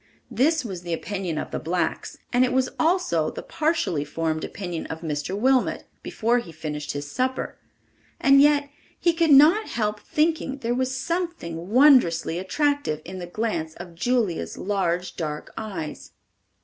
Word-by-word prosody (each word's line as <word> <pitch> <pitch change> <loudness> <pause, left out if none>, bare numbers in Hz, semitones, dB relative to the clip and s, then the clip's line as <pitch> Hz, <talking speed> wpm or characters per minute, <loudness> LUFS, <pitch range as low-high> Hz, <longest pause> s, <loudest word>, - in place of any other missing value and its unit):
This 285 +5 +2
was 190 -5 -5
the 175 -1 -4
opinion 185 -1 -3
of - - -4
the - - -2
blacks, 175 +3 -2 0.2
and 245 +1 +5
it 255 - +1
was 260 0 +2
also 315 - +2
the - - -7
partially 300 - 0
formed 155 +1 -2
opinion 175 -4 -5
of 160 0 -6
Mr. 155 +3 -3
Wilmot 260 +3 +2 0.2
before 235 +2 +1
he 175 -8 -9
finished 150 -2 -5
his 145 0 -4
supper; 260 - -2 0.6
and 275 0 +6
yet 290 -1 +4 0.3
he 340 - +3
could 330 -1 +2
not 310 +10 +7
help 210 -2 -1
thinking 305 +2 0
there 240 -3 -1
was 260 +1 -1
something 260 - -3
wondrously 235 - +5
attractive 235 - 0
in 185 +1 -7
the 175 - -6
glance 175 -5 -2
of 175 -1 -9
Julia's 215 0 -1
large, 185 -3 -1
dark 150 -3 -4
eyes. 185 -9 -6
210 Hz, 155 wpm, -24 LUFS, 165-275 Hz, 0.6 s, not